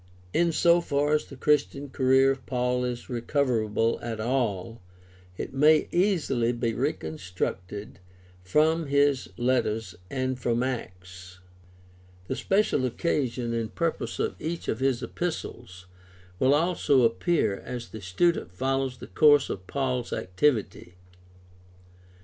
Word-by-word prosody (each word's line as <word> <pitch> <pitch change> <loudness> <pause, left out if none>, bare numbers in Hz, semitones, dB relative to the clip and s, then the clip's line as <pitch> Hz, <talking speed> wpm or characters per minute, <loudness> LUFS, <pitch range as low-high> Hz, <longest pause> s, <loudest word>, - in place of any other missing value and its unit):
— 90 0 -27
In 170 -1 +3
so 170 +2 +4
far 145 -1 0
as 150 - +1
the 140 - -10
Christian 145 0 +1
career 130 0 +3
of 135 -2 -5
Paul 125 -1 0
is 125 -1 -4
recoverable 115 -3 0
at 115 -2 -4
all, 115 -3 -1 0.6
it - - -5
may 150 +3 +4
easily 160 - +1
be 115 -1 -1
recon 80 -6 -2
structed 95 +2 -5 0.4
from 155 - +2
his 140 -1 +2
letters 115 -5 0 0.2
and 130 -1 -2
from 120 0 0
Acts. 95 -7 -6 0.9
The 130 - -3
special 195 -4 +1
occasion 125 -3 -1
and 115 -1 -3
purpose 160 -8 -2
of - - -1
each 165 +2 -4
of - - -1
his 135 -2 0
epistles 120 - -5 0.5
will 135 +2 +4
also 150 -5 +2
appear 115 - +1
as 120 -1 -7
the 110 - -9
student 95 - 0
follows 135 +5 -1
the - - -9
course 145 -1 +4
of 95 -1 -7
Paul's 130 -3 -2
activity. 100 -3 -1
125 Hz, 130 wpm, -27 LUFS, 115-145 Hz, 0.9 s, so